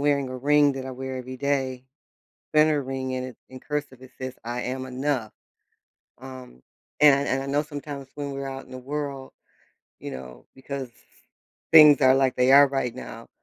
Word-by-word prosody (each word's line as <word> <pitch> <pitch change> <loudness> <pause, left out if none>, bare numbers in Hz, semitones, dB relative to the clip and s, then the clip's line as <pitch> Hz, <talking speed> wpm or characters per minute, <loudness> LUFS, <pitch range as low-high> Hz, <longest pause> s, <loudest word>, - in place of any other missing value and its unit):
wearing 140 -2 +1
a 130 - -6
ring 145 +2 +4
that 135 -1 -6
I - - -5
wear 130 0 -6
every 130 0 -7
day. 130 -2 -2 0.7
Vena 155 -1 +4
ring, 130 -1 -4
and 130 0 -3
it 130 - -10
in 130 0 -11
cursive, 145 -3 -5
it 130 - -14
says, 130 -1 -5
"I 120 +1 -3
am 130 +1 -4
enough." 130 -3 -2 0.9
Um, 130 - -11 0.4
and 140 -1 +5
I - - -1
and 135 0 0
I - - -6
know 140 +2 +1
sometimes 145 -2 -7
when 145 -1 -4
we're 135 0 -5
out 135 0 -7
in - - -18
the 130 - -7
world, 140 0 -5 0.7
you - - -7
know, 65 -1 -10
because 135 -1 -6 0.8
things 150 -3 +9
are 130 0 +6
like 135 -1 +2
they 125 +1 +3
are 140 +1 +8
right 135 -3 -2
now, 115 -2 -9
135 Hz, 190 wpm, -25 LUFS, 130-140 Hz, 0.9 s, things